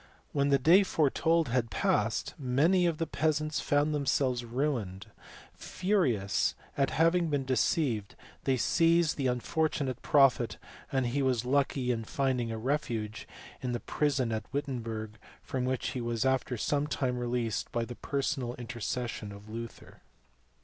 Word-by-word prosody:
When 140 0 +1
the 140 - +5
day 165 +9 +6
foretold 160 -3 +2
had 120 -1 0
passed, 110 0 0
many 155 +8 +3
of 165 -2 -1
the 165 - -1
peasants 155 -1 0
found 145 +1 +1
themselves 135 -3 +1
ruined: 120 -6 -2 0.5
furious 135 - 0 0.2
at 140 -1 +2
having 165 +1 +2
been 140 -3 0
deceived, 125 -4 0 0.3
they 130 -1 +2
seized 165 +5 +3
the 135 -2 0
unfortunate 130 +1 -1
prophet, 135 -5 +3 0.3
and 135 -1 +1
he 130 +4 0
was 125 -3 +1
lucky 135 -1 +1
in 115 -2 -2
finding 125 -1 -1
a 115 - -3
refuge 115 -4 -2 0.3
in 125 -1 -2
the 120 - -1
prison 135 -5 0
at 110 -1 -4
Wittenberg, 115 -6 -4 0.2
from 130 -1 -2
which 130 0 -1
he 130 -2 -4
was 120 +1 -1
after 130 -1 +1
some 145 +6 0
time 125 -4 -1
released 120 -3 -2
by 120 -1 -1
the 120 - -7
personal 135 -2 -2
intercession 120 -2 -4
of 100 +1 -12
Luther. 115 +1 -8
130 Hz, 145 wpm, -30 LUFS, 120-145 Hz, 0.5 s, day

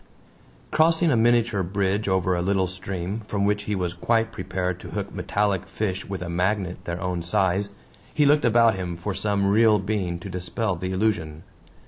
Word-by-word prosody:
Crossing 160 +1 +3
a - - +3
miniature 115 -2 +3
bridge 100 +3 -1
over 95 -1 +1
a 85 - -1
little 95 +1 +1
stream, 95 +2 -4
from 100 -1 0
which 105 0 0
he 105 - -1
was 90 -2 -2
quite 115 +5 +1
prepared 90 -2 -3
to - - -10
hook - - -4
metallic 100 -3 -1
fish 95 -1 -3
with 95 -2 -4
a - - -6
magnet 90 +1 -1
their 85 0 -3
own 90 -1 -2
size, 95 +3 +1 0.4
he 150 - +2
looked 145 +1 +4
about 115 -1 +5
him 90 -2 -4
for 95 +4 -3
some 100 0 0
real 105 +2 +5
being 95 -3 -2
to 90 - -9
dispel 95 +3 -2
the 90 +2 -4
illusion. 95 -6 -1
95 Hz, 180 wpm, -24 LUFS, 90-105 Hz, 0.4 s, about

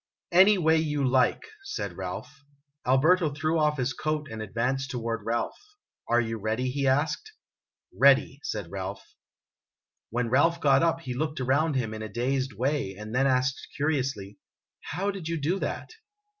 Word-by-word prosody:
"Any 190 +4 +7
way 160 -2 +3
you 150 -3 0
like," 130 - +2 0.2
said 415 +1 -4
Ralph. 140 +1 -7 0.4
Alberto 155 +6 +4
threw 155 +3 0
off 150 -1 +2
his 130 0 -1
coat 155 +3 -2
and 110 -1 -5
advanced 125 +6 -1
toward 115 -3 -3
Ralph. 115 +2 -2 0.3
" - - -57
Are 120 - +4
you 115 -1 -2
ready?" 110 +5 -1
he 140 +1 -1
asked. 155 - 0 0.6
"Ready," 135 0 +4
said 105 -9 -4
Ralph. 100 0 -5 1.0
When 120 0 -1
Ralph 165 +6 +3
got 135 -2 +4
up 165 0 +1
he 130 -5 -5
looked 150 +3 -2
around 140 +4 +1
him 115 -4 -1
in 110 - -6
a 110 - -5
dazed 130 +4 -1
way, 125 -3 -1
and 105 +2 -8
then 135 +2 +3
asked 130 0 0
curiously, 130 -9 -2 0.2
" - - -66
How 195 +5 0
did 190 -5 -7
you 165 0 -1
do 170 +7 0
that - - -4
135 Hz, 170 wpm, -27 LUFS, 120-155 Hz, 1.0 s, Any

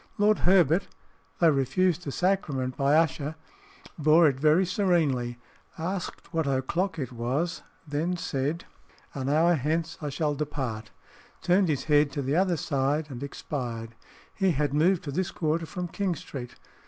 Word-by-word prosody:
Lord 210 +1 +3
Herbert, 180 -1 +4 0.5
though 170 - +5
refused 160 +6 +1
the 140 - -3
sacrament 145 -9 0
by 140 +1 +2
Usher, 155 -1 +1 0.6
bore 155 +2 +6
it 135 -2 0
very 155 +5 +4
serenely, 160 - +1 0.4
asked 180 0 -5
what 160 -3 0
o'clock 160 +7 -1
it 130 -5 -4
was, 130 +8 -2 0.3
then 160 +5 -1
said, 155 -2 -2 0.5
"An 135 -1 -3
hour 165 +4 +4
hence 160 +2 -1
I 150 - -3
shall 150 +1 -1
depart," 130 -7 -4 0.5
turned 185 +2 +3
his 145 -4 0
head 150 -1 +4
to 145 - -2
the 135 +3 0
other 180 -1 +2
side, 145 +2 -1
and 125 -1 -7
expired. 120 -5 -5 0.4
He 190 -3 +1
had 145 -1 0
moved 175 +4 +3
to 145 - -5
this 185 +5 -1
quarter 160 0 -1
from 180 0 -4
King 185 0 -2
Street. 125 -4 -8
155 Hz, 155 wpm, -27 LUFS, 135-175 Hz, 0.6 s, bore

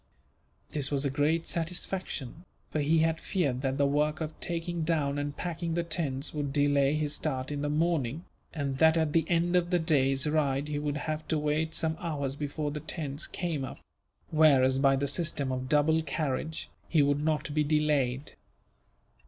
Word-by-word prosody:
This 140 -2 +1
was 140 -1 0
a 140 - +1
great 155 +4 +1
satisfaction, 170 -3 -3 0.3
for 155 - -1
he 155 +2 +3
had 160 0 0
feared 140 -10 -1
that 135 -1 -1
the 140 - +3
work 150 +2 +1
of 160 -1 -4
taking 170 0 -3
down 150 -3 0
and 145 0 -4
packing 170 -1 -3
the 170 - +1
tents 155 -4 -3
would 145 -2 -2
delay 145 0 +3
his 150 -1 0
start 135 -3 -2
in 145 -1 -3
the 145 - -1
morning, 155 -1 0 0.3
and 140 -3 -3
that 160 0 +5
at 160 -2 +1
the 160 -1 +2
end 175 +1 +2
of 175 -1 +2
the 180 - +3
day's 135 -4 +2
ride 150 -2 +1
he 145 -1 -1
would 145 0 -2
have 155 +1 -4
to 160 - +1
wait 150 +2 0
some 160 0 0
hours 140 -5 -2
before 145 +1 -3
the 150 - -4
tents 150 -1 -4
came 165 -6 -3
up; - - -6 0.5
whereas 135 -4 +5
by 135 -1 +4
the 140 +1 -1
system 145 -3 0
of 130 0 -3
double 155 +2 +3
carriage, 155 0 -3 0.2
he 155 -3 +4
would 145 +1 +1
not 155 -1 0
be 155 0 +2
delayed. 150 -3 +1
150 Hz, 185 wpm, -29 LUFS, 140-160 Hz, 0.5 s, that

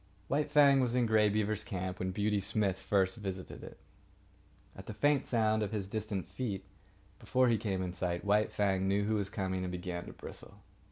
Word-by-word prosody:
White 145 +2 +1
Fang 140 -2 +6
was 125 -2 +1
in 125 -1 +3
Grey 110 -1 +4
Beaver's 105 0 0
camp 95 -2 -4
when 95 - -1
Beauty 105 +2 0
Smith 100 -1 0
first 95 0 +1
visited 95 -3 -6
it. - - -10 1.0
At 95 - -11
the 110 - -6
faint 145 +1 +2
sound 110 -2 +2
of 105 - -2
his 100 -3 -2
distant 105 -4 -3
feet, 95 +1 -4 0.5
before 130 -1 +2
he 115 - +3
came 95 -3 -1
in 90 -1 -4
sight, 90 0 -2
White 105 +1 +3
Fang 95 -2 +1
knew 100 +1 +2
who 110 +2 0
was 100 -2 0
coming 95 -3 -2
and 90 -1 -3
began 90 -1 -5
to - - -8
bristle. - - -9
100 Hz, 200 wpm, -32 LUFS, 95-110 Hz, 1.0 s, Fang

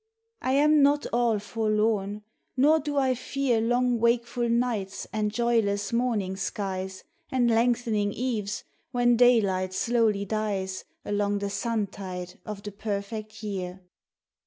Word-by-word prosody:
I 260 - 0
am 300 +2 +5
not 285 +1 +4
all 235 -2 +3
forlorn, 210 -1 0 0.3
nor 300 +5 +5
do 290 -1 -3
I 265 -2 +3
fear 255 -1 0
Long 245 +1 +2
wakeful 235 +1 +1
nights 230 -5 -1
and 215 -1 0
joyless 220 -3 +1
morning 225 -6 0
skies 190 -1 -4 0.3
And 245 -2 +3
lengthening 230 -3 +2
eves 210 -4 -2 0.3
when 245 -1 +3
daylight 200 -6 +3
slowly 225 -4 +2
dies 200 -3 -2 0.2
Along 205 0 0
the 200 0 -3
suntide 195 -4 -3
of 205 -1 -6
the 205 - -5
perfect 215 +1 -5
year. 190 -3 -4
220 Hz, 125 wpm, -27 LUFS, 200-240 Hz, 0.3 s, am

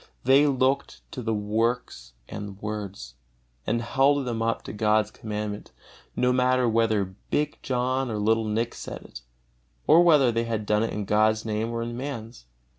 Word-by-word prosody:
They 135 +3 +5
looked 135 0 0
on 125 -4 -6
the 110 - 0
works 105 - -2
and 100 -1 -7
words, 100 - -6 0.5
and 115 +2 0
held 135 +3 +2
them 115 -2 -3
up 115 0 -1
to - - -7
God's 105 0 +2
Commandment, 105 -1 -5 0.4
no 125 0 +2
matter 125 0 +2
whether 110 -4 +1 0.2
big 150 0 -1
John 130 +1 -1
or 110 - -3
little 110 +2 +2
Nick 115 +2 -1
said - - -8
it, 60 - -11 0.6
or 165 +2 +7
whether 150 -8 +5
they 115 0 -1
had 110 -2 -3
done 105 0 +2
it 115 - -1
in 105 -1 -3
God's 110 +2 +2
Name 110 +1 -1
or 115 0 -2
in 120 0 -5
man's. 120 - -7
115 Hz, 170 wpm, -26 LUFS, 105-125 Hz, 0.6 s, or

